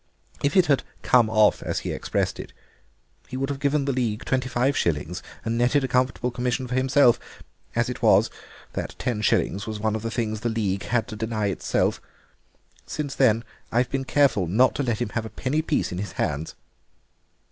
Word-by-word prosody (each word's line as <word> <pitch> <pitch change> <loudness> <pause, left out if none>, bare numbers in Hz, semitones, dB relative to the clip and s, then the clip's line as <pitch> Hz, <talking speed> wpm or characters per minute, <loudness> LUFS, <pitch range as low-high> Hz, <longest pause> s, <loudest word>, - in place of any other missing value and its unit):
If 140 +6 +1
it 185 - +6
had 140 -5 +3 0.2
come 120 -3 +4
off, 110 -1 +4
as - - -2
he - - -3
expressed - - -2
it, - - -8 0.7
he 130 - -6
would 135 +1 -1
have 140 -1 -3
given 140 0 +1
the 140 - +1
League 120 -4 -1
twenty 130 -1 0
five 125 +3 +1
shillings 85 - -1 0.2
and 115 +1 -1
netted 130 +4 +3
a - - 0
comfortable 125 -1 +1
commission 125 +1 -1
for 125 - -5
himself; 130 -1 +4 0.6
as - - +2
it - - -5
was, - - +5 0.4
that - - -4
ten 120 -4 -2
shillings 100 0 +1
was 110 -1 -4
one 110 0 0
of 110 - -3
the 115 - -3
things 110 -1 -2
the 120 - -1
League 100 -4 -1
had 120 +1 0
to 110 - -6
deny 110 -1 -1
itself. 95 - 0 0.9
Since 145 -2 -3
then 115 -4 +3 0.3
I've 120 +1 +1
been 135 -1 -1
careful 130 - +3
not 115 +9 +4
to - - 0
let 120 -4 0
him - - -4
have 115 +1 -2
a - - -10
penny 140 +7 -1
piece 155 -1 0
in 90 - -4
his 100 - -5
hands." 75 +3 -2
120 Hz, 200 wpm, -25 LUFS, 110-130 Hz, 0.9 s, it